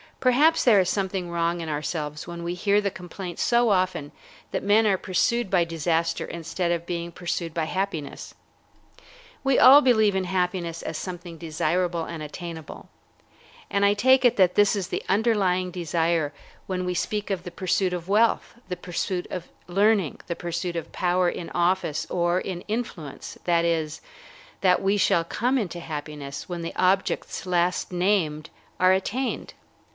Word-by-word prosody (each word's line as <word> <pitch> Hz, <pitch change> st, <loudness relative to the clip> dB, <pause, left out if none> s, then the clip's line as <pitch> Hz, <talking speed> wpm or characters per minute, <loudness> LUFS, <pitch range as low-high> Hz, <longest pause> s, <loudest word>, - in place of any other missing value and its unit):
Perhaps 295 Hz, +6 st, +4 dB
there 225 Hz, -5 st, +6 dB
is 185 Hz, -1 st, +2 dB
something 190 Hz, -2 st, -2 dB
wrong 170 Hz, 0 st, 0 dB
in 165 Hz, -, -5 dB
ourselves 150 Hz, 0 st, -3 dB
when 170 Hz, 0 st, -6 dB
we 170 Hz, +1 st, -2 dB
hear 200 Hz, +3 st, +2 dB
the 200 Hz, -1 st, -1 dB
complaint 180 Hz, -1 st, -8 dB
so 240 Hz, -1 st, +3 dB
often 185 Hz, -7 st, 0 dB, 0.4 s
that -, -, -2 dB
men 210 Hz, +3 st, +4 dB
are 200 Hz, -3 st, +3 dB
pursued 195 Hz, +5 st, 0 dB
by 180 Hz, -3 st, +3 dB
disaster 165 Hz, 0 st, -1 dB
instead 170 Hz, +1 st, -3 dB
of 170 Hz, -1 st, -1 dB
being 170 Hz, -1 st, -3 dB
pursued 170 Hz, -1 st, -3 dB
by 165 Hz, -2 st, 0 dB
happiness. 175 Hz, -4 st, -4 dB, 1.1 s
We 270 Hz, -1 st, +3 dB
all 275 Hz, +3 st, +9 dB
believe 220 Hz, -7 st, +4 dB
in 190 Hz, -1 st, 0 dB
happiness 180 Hz, -2 st, -2 dB
as 160 Hz, -, -4 dB
something 175 Hz, -2 st, -7 dB
desirable 170 Hz, +1 st, -1 dB
and 165 Hz, -2 st, -6 dB
attainable, 160 Hz, 0 st, -8 dB, 0.8 s
and 200 Hz, -, +1 dB
I 200 Hz, 0 st, +5 dB
take 260 Hz, +5 st, +4 dB
it 245 Hz, -, +4 dB
that 185 Hz, -2 st, +5 dB
this 205 Hz, 0 st, +4 dB
is 195 Hz, -3 st, -2 dB
the -, -, -3 dB
underlying 195 Hz, -4 st, +2 dB
desire 165 Hz, -3 st, 0 dB, 0.3 s
when 185 Hz, -1 st, -2 dB
we 180 Hz, -, -1 dB
speak 205 Hz, +4 st, -2 dB
of 190 Hz, -3 st, -1 dB
the 175 Hz, -, -7 dB
pursuit 185 Hz, +1 st, 0 dB
of 175 Hz, -1 st, -4 dB
wealth, 220 Hz, +4 st, +2 dB
the 180 Hz, -, -3 dB
pursuit 180 Hz, +1 st, -3 dB
of 180 Hz, -2 st, -5 dB, 0.2 s
learning, 195 Hz, -2 st, +2 dB
the 170 Hz, -, -2 dB
pursuit 170 Hz, +1 st, -3 dB
of 165 Hz, -, -5 dB
power 180 Hz, 0 st, +1 dB
in 170 Hz, -, -6 dB
office 175 Hz, -3 st, 0 dB
or 175 Hz, 0 st, +1 dB
in 185 Hz, -2 st, -5 dB
influence, 210 Hz, -, -5 dB
that 170 Hz, -1 st, +3 dB
is, 160 Hz, -2 st, -1 dB, 0.6 s
that 180 Hz, -2 st, +4 dB
we 195 Hz, +2 st, +2 dB
shall 170 Hz, -4 st, +3 dB
come 245 Hz, +10 st, 0 dB
into 180 Hz, -5 st, -4 dB
happiness 150 Hz, -3 st, -6 dB
when 175 Hz, -1 st, -4 dB
the 165 Hz, -, -5 dB
objects 190 Hz, +1 st, 0 dB
last 180 Hz, +1 st, +1 dB
named 175 Hz, -5 st, 0 dB, 0.3 s
are 185 Hz, 0 st, +5 dB
attained. 225 Hz, +8 st, -2 dB
180 Hz, 165 wpm, -25 LUFS, 170-195 Hz, 1.1 s, all